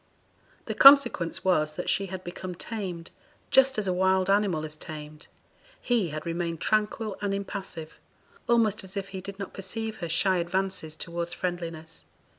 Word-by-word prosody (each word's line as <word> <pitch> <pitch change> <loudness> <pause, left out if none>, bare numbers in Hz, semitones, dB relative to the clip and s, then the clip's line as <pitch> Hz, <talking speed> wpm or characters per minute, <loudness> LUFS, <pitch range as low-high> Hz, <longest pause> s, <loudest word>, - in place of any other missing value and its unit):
The - - -3
consequence 275 -14 +6
was 155 -5 +2
that 180 - -5
she 195 0 +1
had 185 0 -7
become 180 +1 -6
tamed, 185 -5 -5 0.4
just 265 0 +5
as 210 -2 0
a 185 - +1
wild 190 +1 +2
animal 195 -6 +2
is 155 0 -6
tamed; 155 -1 -9 0.5
he 230 -8 +1
had 155 0 -6
remained 170 -1 -2
tranquil 215 0 0
and 200 -1 0
impassive, 195 -5 -6 0.5
almost 225 -4 +3
as 190 +1 -7
if 195 0 -4
he 190 -1 -6
did 200 +1 -8
not 195 -2 -6
perceive 220 +3 -4
her 170 -3 -5
shy 185 +3 +3
advances 175 -2 -2
towards 170 +1 -4
friendliness. 165 -3 -5
185 Hz, 160 wpm, -27 LUFS, 170-200 Hz, 0.5 s, consequence